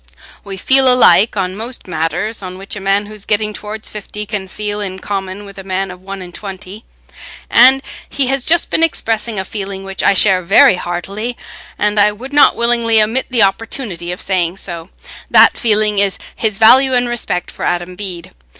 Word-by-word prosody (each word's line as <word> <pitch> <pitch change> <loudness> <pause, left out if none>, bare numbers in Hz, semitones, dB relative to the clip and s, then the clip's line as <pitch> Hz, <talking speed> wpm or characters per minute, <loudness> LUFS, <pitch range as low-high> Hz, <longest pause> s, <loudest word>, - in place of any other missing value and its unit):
We 195 -1 -7
feel 265 +5 +5
alike 220 -4 +4
on 185 -1 -2
most 230 +1 -6
matters 175 +6 -3
on 185 -1 -8
which 195 +2 -8
a - - -6
man 195 +1 0
who 210 - -11
is 210 -2 -9
getting 210 0 -1
towards 215 +1 -7
fifty 210 0 -6
can 205 -2 -5
feel 210 +2 -4
in 190 -2 -5
common 195 +1 -5
with 200 0 -12
a - - -6
young 190 - -16
man 190 0 -2
of 180 0 -12
one 195 0 -8
and 175 -1 -12
twenty, 195 +2 -9 0.7
and 260 +3 +6 0.3
he 280 - 0
has 270 0 -1
just 340 +4 +2
been - - 0
expressing 225 -9 0
a 190 - -3
feeling 195 -1 -6
which 195 0 -5
I 200 - +3
share 190 -1 +4
very 175 - +5
heartily, 200 +8 -5 0.4
and 210 0 0
I 210 +1 +4
would 260 +7 -10
not 290 0 +5
willingly 235 -1 +2
omit 225 +5 +1
the 240 -4 +3
opportunity 195 -3 -2
of 180 - -6
saying 185 -2 -1
so. 170 -2 -6 0.4
That - - +6
feeling 215 -2 +1
is 200 -1 +2 0.2
his 215 -3 -1
value 255 +4 +5
and 245 0 +1
respect 235 -7 -3
for - - -9
Adam 175 +1 -2
Bede. 180 -4 -7
205 Hz, 195 wpm, -15 LUFS, 190-225 Hz, 0.7 s, and